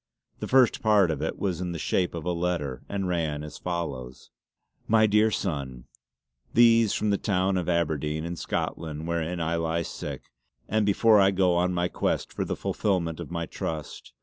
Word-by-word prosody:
The - - -4
first 130 -3 +4
part 105 -6 +4
of 75 - -3
it - - -2
was 95 -3 -2
in 90 -1 -3
the - - -4
shape 90 +2 0
of 85 -1 -6
a 90 - 0
letter, 85 -7 -2
and 95 -2 -2
ran 80 -4 -1
as 75 - -9
follows: 70 -8 -5 0.6
"My 110 0 +5
deare 105 +1 +4
Sonne, 70 - -3 0.7
These 115 -2 +6
from 105 - 0
the 100 - +1
towne 95 -2 +1
of 90 -3 -1
Aberdeyne 80 -2 0
in 85 +1 -4
Scotland 80 -2 -4
wherin 85 +1 -2
I 85 0 0
lie 85 0 -1
sick, - - -7 0.4
and 110 0 +1
before 105 +1 +5
I 95 0 +6
go 95 -2 +2
on 90 +1 +2
my 90 0 +1
quest - - -2
for - - -2
the - - -3
fullfillment 85 -6 -1
of - - -6
my 85 -1 -3
Trust. 80 -2 -6
85 Hz, 185 wpm, -26 LUFS, 80-100 Hz, 0.7 s, These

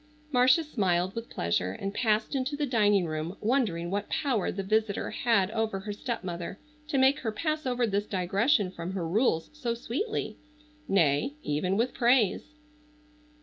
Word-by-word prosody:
Marcia 255 +5 +5
smiled 190 - 0
with 230 0 -6
pleasure 90 +2 -1
and 195 - -4
passed 220 +1 +1
into 270 +1 -1
the 295 0 -1
dining 205 -7 +3
room 155 +3 -4
wondering 210 -8 0
what 205 +1 -2
power 255 -9 0
the 195 - -4
visitor 215 +1 0
had 215 -5 +2
over 220 -3 -1
her 205 +1 -5
stepmother 190 -6 -5 0.3
to 295 - -1
make 265 +2 +4
her 225 - -2
pass 310 +5 -2
over 245 -1 +1
this 205 -1 -1
digression 195 - +1
from 175 0 -6
her 180 -4 -2
rules 170 -3 +1
so 250 -6 -2
sweetly,—nay, 300 - -2
even 180 +6 0
with 235 +3 +1
praise. 245 +3 +2
215 Hz, 150 wpm, -28 LUFS, 185-260 Hz, 0.3 s, Marcia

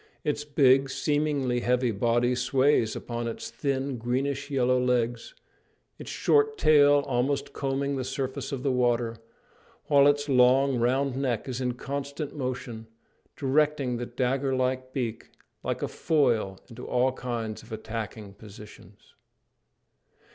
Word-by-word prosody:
Its 145 0 -1
big, 135 -2 +4
seemingly 145 -3 0
heavy 125 0 +1
body 120 +4 +1
sways 130 -1 +2
upon 120 -1 -4
its 115 - -6
thin, 135 -2 -2
greenish 135 +4 -2
yellow 130 -2 +2
legs, 125 - -1 0.6
its - - -8
short 440 0 +2
tail 145 - +5
almost 135 +3 -1
combing 140 +1 -1
the 130 - -2
surface 135 +1 -4
of 135 -2 -4
the 140 - +1
water, 120 -2 +1 0.7
while 140 -1 +6
its 145 0 +2
long, 130 0 +4
round 130 +3 +1
neck 130 -4 -2
is 130 0 -4
in 125 -1 -1
constant 140 +3 -5
motion, 125 -4 -5 0.5
directing 140 -2 +1
the 120 0 -4
dagger 130 +2 -1
like 130 0 -1
beak 120 -4 -4 0.3
like - - -3
a - - 0
foil 120 - +1
into 125 0 -10
all 125 +1 +2
kinds 120 -4 -4
of 115 - -17
attacking 110 -2 -6
positions. 105 -1 -14
130 Hz, 135 wpm, -27 LUFS, 120-140 Hz, 0.7 s, while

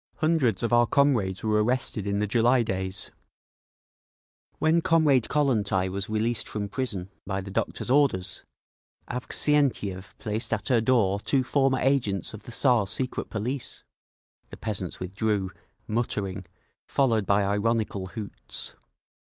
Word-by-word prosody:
Hundreds 150 - +1
of 120 - 0
our 120 0 +5
comrades 120 -10 +2
were 105 -1 +2
arrested 115 -3 0
in 100 0 0
the 105 - +1
July 120 +4 +3
days…. 95 -3 -4 1.5
When 160 +2 +3
Comrade 155 -8 +3
Kollontai 105 -10 +1
was 100 +3 -4
released 110 +2 -1
from 100 -1 -4
prison 100 -6 -4 0.2
by 95 -1 -1
the 95 0 -7
doctor's 120 - -2
orders, 135 -10 +2 0.6
Avksentiev 125 -7 0
placed 110 +2 -3
at 105 -2 -1
her 120 -3 +4
door 110 -5 +2
two 130 +5 +1
former 135 0 +2
agents 120 -9 +1
of 110 -1 -10
the - - -8
Tsar's 120 -5 +3
secret 125 +4 -2
police!" 120 +5 -4 0.7
The - - -10
peasants 95 -5 -4
withdrew, 95 +1 -1 0.4
muttering, 100 -4 -2 0.4
followed 115 -7 +1
by 100 0 +3
ironical 105 -1 0
hoots. 105 0 -7
110 Hz, 130 wpm, -26 LUFS, 100-130 Hz, 1.5 s, our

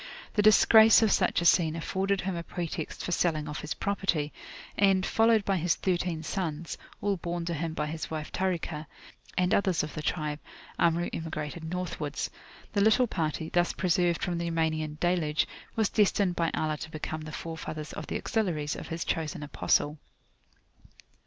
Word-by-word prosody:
The 210 - +3
disgrace 220 +1 +7
of 215 - +3
such - - +2
a - - -2
scene 165 -2 +4
afforded 190 +4 -1
him 190 -1 -2
a 170 - -3
pretext 170 -1 -5
for - - -3
selling 160 -3 +1
off 150 0 -4
his 150 - -4
property, 185 -7 -1 0.4
and, 195 -1 +3
followed 225 -2 +3
by 195 -1 +1
his 170 0 +1
thirteen 175 -3 -1
sons, 165 -2 -3 0.3
all 200 -1 +1
borne 170 0 -3
to 170 - -2
him 160 0 -3
by 150 - -1
his 160 +1 -5
wife 155 -2 -5
Tarikah, 170 -4 -2 0.5
and 180 +3 +2
others 190 -6 +2
of 150 - -5
the 155 - -4
tribe, 150 -1 -2 0.4
Amru 170 +1 +2
emigrated 160 0 -4
Northwards. 160 -4 -3 0.4
The 200 - +2
little 220 +4 +5
party, 160 -6 -2
thus 175 0 +2
preserved 175 -1 +1
from 175 -2 -1
the 170 0 -2
Yamanian 155 -2 -1
Deluge, 170 -4 +1 0.3
was 220 -2 +2
destined 200 -3 +2
by 165 -1 +1
Allah 155 -1 -1
to 160 +1 -7
become 155 0 -5
the 155 0 -7
forefathers 160 -2 -6
of 155 - -6
the - - -2
Auxiliaries 165 -10 -1
of - - -7
his 165 0 -4
chosen 155 -2 -2
Apostle. 150 +1 +1
170 Hz, 170 wpm, -29 LUFS, 155-185 Hz, 0.5 s, disgrace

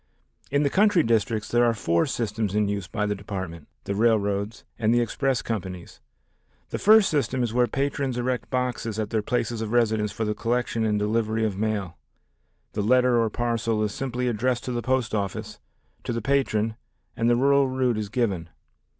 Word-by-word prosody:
In 145 +1 +2
the 140 - +1
country 205 -4 +4
districts 110 -2 +1
there 120 0 +3
are 120 -1 +3
four 85 - +1
systems 110 -5 -2
in 105 -1 +2
use 100 -2 -3
by 105 - -2
the 105 - 0
Department, 95 -5 -6 0.2
the 100 - -3
railroads, 105 -1 +1 0.2
and 110 -1 +2
the 120 - +4
express 130 +2 0
companies. 95 -5 -5 0.7
The - - -3
first 215 -1 +6
system 130 -4 0
is 115 -2 -2
where 125 0 +3
patrons 135 0 -1
erect 125 0 -2
boxes 125 -4 -2
at 110 -1 -3
their 110 -2 +1
places 115 0 -1
of 110 -1 -3
residence 110 -3 +2
for 110 +1 -3
the 105 - 0
collection 115 0 -1
and 105 -1 +1
delivery 110 +1 0
of 105 -3 -1
mail. 100 -4 -2 0.7
The 105 - -1
letter 125 +2 +4
or 115 - +1
parcel 115 -1 -1
is 105 -1 -2
simply 125 -2 -2
addressed 120 +2 0
to 125 - -4
the 120 -1 -2
post 130 -3 0
office, 100 -3 -3 0.4
to - - -3
the 115 - -1
patron 115 -5 0 0.4
and 115 0 +1
the 120 - +4
rural 140 +2 +4
route 130 -3 0
is 105 -2 -4
given. 100 -8 -1
115 Hz, 185 wpm, -25 LUFS, 105-125 Hz, 0.7 s, first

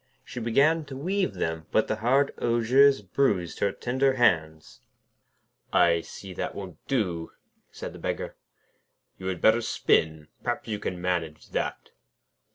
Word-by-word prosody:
She 125 - -7
began 140 +8 +3
to 135 -2 -8
weave 190 +6 -1
them, 80 -1 -3
but 110 - +2
the 110 - -1
hard 135 +5 +2
osiers 120 +2 +4
bruised 95 -4 0
her 100 - +2
tender 130 +5 +1
hands. 80 -11 +1 0.9
'I 85 -1 +4
see 95 +3 -10
that - - -4
won't 95 -5 -7
do,' 90 -11 -1 0.4
said - - -8
the - - -11
Beggar. - - -3 0.8
'You 95 - -5
had 95 -1 -3
better 110 +2 +5
spin; 80 -8 +1
perhaps 120 -1 -3
you 105 -2 -3
can 90 -3 -4
manage 85 -4 -3
that.' - - -3
110 Hz, 145 wpm, -27 LUFS, 85-130 Hz, 0.9 s, better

